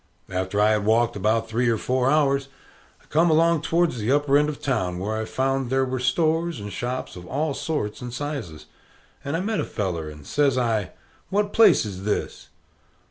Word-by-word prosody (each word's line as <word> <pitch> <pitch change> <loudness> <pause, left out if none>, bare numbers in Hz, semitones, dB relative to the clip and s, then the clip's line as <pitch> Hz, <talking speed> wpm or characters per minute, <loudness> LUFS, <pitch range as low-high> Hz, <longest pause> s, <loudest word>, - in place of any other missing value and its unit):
After 95 +2 -1
I 105 +1 +4
had 105 -1 +1
walked 115 +2 +2
about 110 +3 +1
three 120 +2 +1
or 115 - +2
four 130 +3 0
hours, 140 -2 +2 0.6
I - - -24
come 165 +3 +2
along 165 0 +3
towards 165 -5 +1
the 110 +4 0
upper 145 0 +3
end 150 +1 +4
of 150 - -5
the - - -23
town, 95 - -1
where 105 +4 -2
I 110 0 -2
found 135 +1 -1
there 135 +1 +2
were 130 0 -3
stores 165 +3 +1
and 105 0 -7
shops 125 +1 -4
of 90 0 -10
all 145 +2 -1
sorts 135 -9 -3
and 125 -1 -6
sizes. 125 - -5 0.6
And 140 +3 -2
I - - -2
met 215 +2 -1
a - - 0
feller, 85 -7 -3
and 75 -1 -12
says 140 -3 +1
I, 110 -6 0 0.4
"What 205 +1 0
place 225 - +6
is 95 -2 -6
this?" 105 0 -3
125 Hz, 200 wpm, -24 LUFS, 105-150 Hz, 0.6 s, place